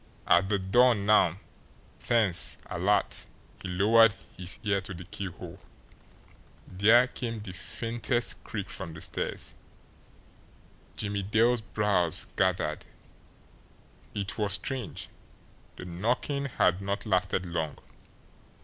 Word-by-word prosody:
At 95 +2 +4
the 105 - +2
door 120 +6 +4
now, 100 -4 +3 0.6
tense, 110 -7 +4
alert, - - +1 0.3
he - - -5
lowered 105 +4 +5 0.2
his 90 -1 -2
ear 100 -2 +1
to 95 0 -7
the 90 - -8
keyhole. 90 0 -8 1.1
There 110 +6 +5
came 115 -2 -5
the 105 -3 -8
faintest 115 +5 -2
creak 100 -3 -5
from 85 -5 -7
the 75 - -10
stairs. - - -3 1.4
Jimmie 100 -1 -2
Dale's 110 +4 +2
brows 100 -5 +1
gathered. - - 0 1.3
It 100 +1 -4
was 105 -3 +1
strange! 120 - -2 0.7
The - - -9
knocking 120 +10 -2
had 95 -8 +1
not 100 +3 -3
lasted 95 -2 0
long. 80 -3 -3
100 Hz, 110 wpm, -28 LUFS, 90-115 Hz, 1.4 s, lowered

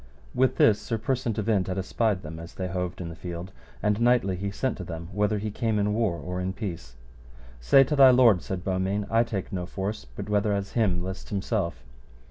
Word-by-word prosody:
With 130 +1 +2
this 105 -1 +4
Sir 115 +2 -2
Persant 120 0 -1
of 105 -1 -2
Inde 100 -5 +2
had 95 0 -3
espied 100 0 0
them 80 +1 -7
as 85 +1 -10
they 95 - -3
hoved 90 0 -3
in 85 - -5
the 85 - -8
field, 85 +2 -7 0.3
and 105 +1 +1
knightly 120 -6 +3
he 100 +2 -3
sent 130 +6 -2
to 95 - -5
them 85 0 -7
whether 105 +2 +1
he 105 +1 -3
came 110 0 -1
in 105 0 +1
war 105 -6 0
or 90 +4 -4
in 95 +1 -2
peace. 85 - -6 0.6
Say 65 - +6
to 150 +3 -1
thy 135 -2 +8
lord, 120 -7 +6
said 95 -2 -5
Beaumains, 95 +2 -1
I 115 +1 +4
take 105 -4 -5
no 90 -2 -3
force, 100 +4 -4
but 100 - -6
whether 105 0 +1
as 100 -1 -2
him 95 -7 +1
list 95 +1 -6
himself. 95 - -2
100 Hz, 220 wpm, -26 LUFS, 90-110 Hz, 0.6 s, thy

